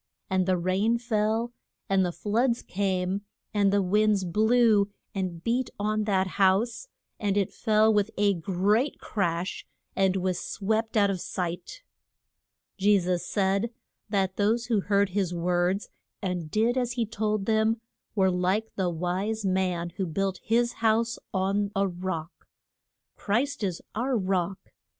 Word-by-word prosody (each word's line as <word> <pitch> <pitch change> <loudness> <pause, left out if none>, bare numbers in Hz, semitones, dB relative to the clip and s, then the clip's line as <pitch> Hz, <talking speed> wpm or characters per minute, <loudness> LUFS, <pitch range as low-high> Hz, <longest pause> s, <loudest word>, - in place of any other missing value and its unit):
And 185 -1 +2
the 185 -1 +3
rain 190 +6 +1
fell, 225 0 0 0.3
and 195 -1 +3
the 180 - 0
floods 230 +6 0
came, 190 0 -1 0.3
and 200 -2 +3
the 200 0 +3
winds 210 +1 +2
blew 215 +2 +3 0.2
and 180 -4 -3
beat 245 +2 0
on 215 +1 0
that 190 -3 +2
house, 200 - +1 0.3
and 205 -1 0
it 200 -2 0
fell 220 -1 +3
with 205 0 +2
a 205 -1 +3
great 195 - +1
crash, 175 -2 -2 0.3
and 190 -1 +2
was 185 -1 0
swept 220 +2 -1
out 200 -1 +4
of 185 -3 -3
sight. 180 - -4 1.0
Je 205 +1 +5
sus 180 -1 0
said 200 +2 +1 0.4
that 190 -2 0
those 225 +3 +2
who 225 -4 +1
heard 200 0 +2
his 185 -2 -1
words 180 +3 0 0.3
and 180 -5 -3
did 230 +7 +2
as 245 -1 -1
he 240 -2 0
told 215 -2 -1
them 220 +1 +2 0.4
were 190 -2 +3
like 185 +5 0
the 185 -2 0
wise 185 +6 -2
man 180 -2 0
who 190 - -1
built 190 +3 -1
his 235 +1 +2
house 230 +1 +2
on 200 +2 0
a 195 0 +2
rock. 175 -2 -5 0.7
Christ 250 +5 -1
is 185 -4 -2
our 245 +3 0
Rock. 185 -2 0
200 Hz, 145 wpm, -27 LUFS, 185-220 Hz, 1.0 s, Je